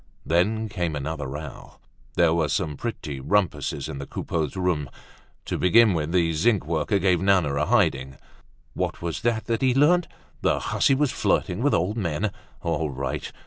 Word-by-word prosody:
Then 105 +7 +1
came 90 -6 -2
another 75 0 -4
row. 75 +2 -8 0.4
There 85 -2 +4
were 80 -2 +1
some 75 +1 -1
pretty 75 - -5
rumpuses 90 -3 0
in 75 -3 -6
the 70 - -6
Coupeaus' 80 -4 -3
room. 90 -7 -1 0.6
To - - -3
begin 110 +3 +5
with, 80 -1 -2
the 85 -2 +2
zinc 95 +4 +2
worker 80 +4 0
gave 90 -2 +2
Nana 95 -7 +3
a 75 +2 0
hiding. 75 - +1 0.6
What - - -3
was 85 -2 -3
that 115 -1 0
he 130 -2 +3
learnt? 165 +5 +4 0.3
The - - +2
hussy 135 - +2
was 140 -1 +1
flirting 100 -5 0
with 145 +2 +3
old 95 +7 0
men. 95 +1 -1 0.3
All 80 -2 -1
right. 65 -1 -4
85 Hz, 165 wpm, -25 LUFS, 75-110 Hz, 0.6 s, begin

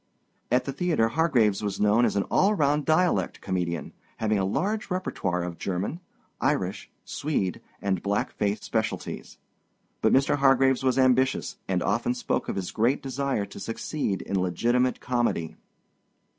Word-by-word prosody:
At 125 +1 +3
the 135 - -3
theater 150 -8 +1
Hargraves 120 -8 +2
was 100 -2 -3
known 105 +3 +4
as - - 0
an 100 - +2
all 205 +2 +2
round 150 -2 +1
dialect 180 +3 +2
comedian, 90 -3 -3 0.2
having 110 -2 +1
a 95 - +1
large 205 - -1
repertoire 95 - -2
of 85 -1 -6
German, 95 - -2 0.4
Irish, - - -1 0.2
Swede, 120 - -2 0.2
and 95 -3 0
black 100 +1 -1
face 105 0 -1
specialties. 110 -1 -3 0.6
But - - +3
Mr. 135 +2 +3
Hargraves 135 -1 +4
was 130 -1 +2
ambitious, 130 0 +2
and 90 -2 0
often 115 +5 0
spoke 125 - -2
of - - -2
his 95 -2 -3
great 120 +5 +1
desire 135 -5 -1
to 100 - -11
succeed 115 -2 -3
in 100 - -1
legitimate 120 +8 +1
comedy. 120 -10 -1
120 Hz, 150 wpm, -26 LUFS, 100-135 Hz, 0.6 s, known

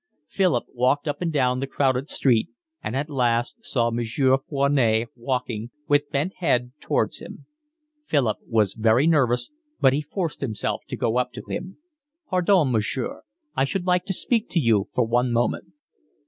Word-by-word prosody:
Philip 175 -9 +1
walked 130 +5 +1
up 145 - -3
and 170 -2 0
down 130 -4 +1
the 135 - -2
crowded 135 0 0
street 120 -5 +2 0.3
and 115 - -3
at 140 +2 -1
last 120 - 0
saw 120 - 0
Monsieur 120 +3 +2
Foinet 130 -6 +2
walking, 120 -2 -3 0.2
with 145 0 +2
bent 150 +8 -2
head, 125 -9 +1
towards - - -1
him; - - -11 0.6
Philip 130 - +1
was 105 -4 +2
very 115 +4 +3
nervous, 135 - +2 0.3
but 130 -1 +5
he 145 - 0
forced 160 +2 -4
himself 110 -7 -2
to - - -5
go 115 +2 +1
up 125 0 -1
to - - -8
him. 190 +1 -5 0.5
"Pardon, 180 -6 +3
monsieur, 115 +2 -1 0.3
I - - +2
should 175 +6 -2
like 180 -1 +2
to 195 - -2
speak 230 +2 0
to 175 - +1
you 110 -8 +2
for 125 - +1
one 120 +2 +1
moment." 120 +1 0
130 Hz, 165 wpm, -24 LUFS, 120-150 Hz, 0.6 s, but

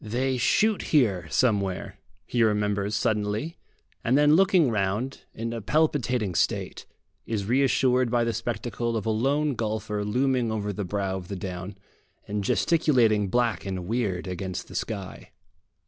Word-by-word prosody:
They 125 +4 -1
shoot 215 - +2 0.2
here 95 - +2
somewhere, 100 -6 0 0.3
he 120 - -1
remembers 105 -1 +1
suddenly; 105 +10 -1 0.4
and 125 +4 +3
then 150 +1 +5
looking 185 -7 +4
round, 105 +5 -2
in 115 +1 -4
a 115 - -4
palpitating 125 - +1
state, - - -1 0.4
is 105 -3 -2
reassured 130 +1 +2
by 120 0 +2
the 115 0 0
spectacle 115 +1 -2
of 105 - -4
a 110 - +1
lone 140 +6 +1
golfer 110 -2 -2
looming 125 +2 +1
over 105 -2 -2
the 105 0 -4
brow 95 0 -2
of 90 -2 -8
the 100 - -5
down, 90 +1 -6 0.5
and 105 0 -2
gesticulating 120 - +3
black 120 +2 0
and 95 -3 -4
weird 100 -4 -1
against 90 0 -5
the - - -10
sky. 100 -4 -5
110 Hz, 145 wpm, -26 LUFS, 100-125 Hz, 0.5 s, then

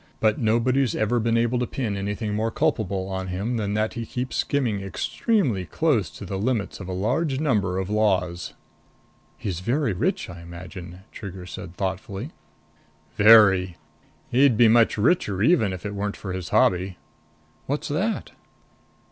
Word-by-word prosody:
But 110 -1 +2
nobody's 120 +3 +2
ever 115 +3 +1
been 115 +1 +1
able 120 +1 +1
to 125 - -1
pin 115 -7 -3
anything 105 +2 -3
more 110 +2 0
culpable 110 - -1
on 95 -1 -4
him 100 +7 -2
than 105 -2 -2
that 110 0 0
he 120 - -4
keeps 125 +3 -4
skimming 120 -9 0
extremely 120 - 0
close 130 - +1
to 85 +6 -10
the 95 +1 -4
limits 110 -1 -1
of 95 - -7
a - - -4
large 130 - 0
number 105 -12 +1
of 95 -1 -2
laws." 95 -5 0 0.8
"He's 90 -5 -4
very 120 +4 0
rich, 90 - -1
I 85 -1 -9
imagine?" 85 +1 -9
Trigger 95 -3 -8
said 90 0 -8
thoughtfully. 95 0 -4 0.8
"Very. 100 -5 +6 0.5
He'd 130 -2 +4
be 120 -1 +7
much 115 0 +4
richer 105 - +2
even 115 - +4
if 95 0 -7
it 105 - -3
weren't 100 0 -3
for 95 -2 -5
his 90 -2 -5
hobby." 90 0 +2 0.7
"What's 145 +2 -2
that?" 195 +10 -1
105 Hz, 155 wpm, -24 LUFS, 95-120 Hz, 0.8 s, be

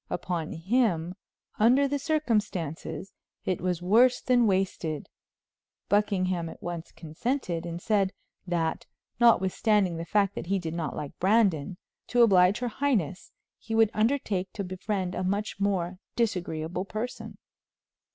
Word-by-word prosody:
Upon 175 -3 -3
him, 180 -2 +1 0.5
under 255 +6 +5
the 285 +1 -1
circumstances, 210 - -2 0.3
it 185 - -1
was 180 -1 -1
worse 240 +7 +5
than 245 -2 +3
wasted. 185 -6 -1 0.8
Buckingham 185 -4 +1
at - - -11
once 175 -1 -6
consented, 170 - -3
and 170 0 -5
said, 195 -1 +1 0.4
that 165 -2 -1 0.3
notwithstanding 205 -4 +3
the 165 - -4
fact 200 +1 +2
that - - -6
he 195 +2 +1
did 165 -3 -4
not 170 -2 -3
like 145 - -7
Brandon, 190 -5 +2 0.3
to 245 -1 +4
oblige 190 -3 +5
her 245 - 0
highness, 220 - -1 0.3
he 225 - -4
would 225 -1 +4
undertake 215 -5 0
to 200 - -4
befriend 185 0 -3
a 185 - -2
much 200 +2 -2
more 185 -2 -1 0.2
disagreeable 180 -6 -1
person. 220 +5 -5
190 Hz, 130 wpm, -28 LUFS, 175-220 Hz, 0.8 s, under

